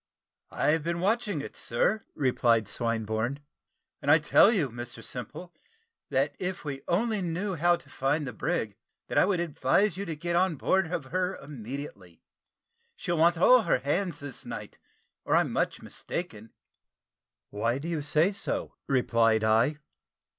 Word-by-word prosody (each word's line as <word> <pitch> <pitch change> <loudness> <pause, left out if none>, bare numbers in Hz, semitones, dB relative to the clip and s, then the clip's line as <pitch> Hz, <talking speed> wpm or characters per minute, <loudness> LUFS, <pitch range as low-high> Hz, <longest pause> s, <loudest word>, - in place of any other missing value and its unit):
"I've 160 +2 +1
been 170 +1 -2
watching 205 -3 0
it, - - -8
sir," 200 - 0
replied 120 -5 +2
Swinburne, 115 +3 -1 0.6
"and 140 - -2
I 150 - +8
tell 155 +7 +5
you, 165 - 0
Mr 120 -1 -8
Simple, 125 - -7 0.6
that - - +1
if 180 -2 -4
we 135 -2 -4
only 210 +4 +1
know 180 +3 -2
how 175 +1 +3
to 170 - -14
find 140 +3 -1
the 125 - -5
brig, 110 -1 -2 0.3
that - - +2
I - - +5
would 190 -2 +1
advise 175 +4 +1
you 200 - -3
to 165 -3 -4
get 170 +3 -2
on 180 -1 +2
board 180 +4 +1
of 160 -6 -2
her 185 +1 0
immediately. 125 - -8 0.7
She'll 170 -2 -2
want 170 +1 +4
all 250 +8 +6
her - - +2
hands 150 +5 -1
this 140 -3 -6
night, - - -8 0.4
or - - +1
I'm - - +2
much - - -1
mistaken." 115 - -6 1.0
"Why 115 +4 0
do 145 +4 -6
you 165 -3 -2
say 150 +6 +2
so?" 200 0 -3
replied 115 -4 +2
I. 115 +7 +3
150 Hz, 155 wpm, -28 LUFS, 120-180 Hz, 1.0 s, I